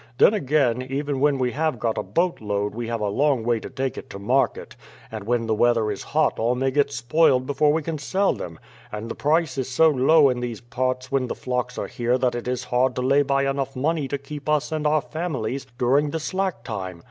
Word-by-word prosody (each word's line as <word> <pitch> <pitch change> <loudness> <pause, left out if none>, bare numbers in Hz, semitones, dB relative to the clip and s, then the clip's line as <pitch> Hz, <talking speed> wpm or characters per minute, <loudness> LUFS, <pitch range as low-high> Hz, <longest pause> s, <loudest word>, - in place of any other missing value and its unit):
Then, 205 - +6
again, 135 - +1
even 135 +2 -3
when 145 0 +3
we 125 -1 0
have 155 -1 -1
got 115 0 -1
a - - -1
boat 175 -4 -1
load 105 -1 -2
we 115 +1 -4
have 115 -1 -3
a 105 - 0
long 135 +3 +1
way 120 0 +1
to - - -8
take 135 0 -3
it - - -13
to - - -7
market, 125 +7 0 0.4
and 110 -2 -6
when 120 0 0
the 110 - 0
weather 115 -1 +2
is - - -5
hot 155 +1 0
all 120 +2 +1
may 135 +1 0
get 140 +1 +2
spoiled 130 +1 +2
before 145 +2 +2
we 160 +1 0
can 160 0 -4
sell 190 +7 +1
them; 85 -2 -7 0.3
and 105 +2 -5
the - - -5
price 150 -2 +1
is 130 - -2
so 160 +5 +4
low 145 +2 +5
in 125 -1 -1
these 120 -3 -4
parts 130 +2 -3
when 135 -2 +1
the - - -4
flocks 125 -1 -3
are - - -2
here 120 +1 0
that 125 -1 +1
it 120 0 -5
is 125 0 -2
hard 125 0 +1
to 125 - -2
lay 135 +2 +4
by 140 -1 +1
enough 135 0 -2
money 150 +2 0
to 140 - -2
keep 145 +1 -8
us 150 0 +1
and 155 -1 0
our 150 0 +3
families 135 -6 -4
during 135 +4 +2
the 160 - -3
slack 185 -5 -2
time. 95 -6 -5
130 Hz, 240 wpm, -23 LUFS, 120-150 Hz, 0.4 s, Then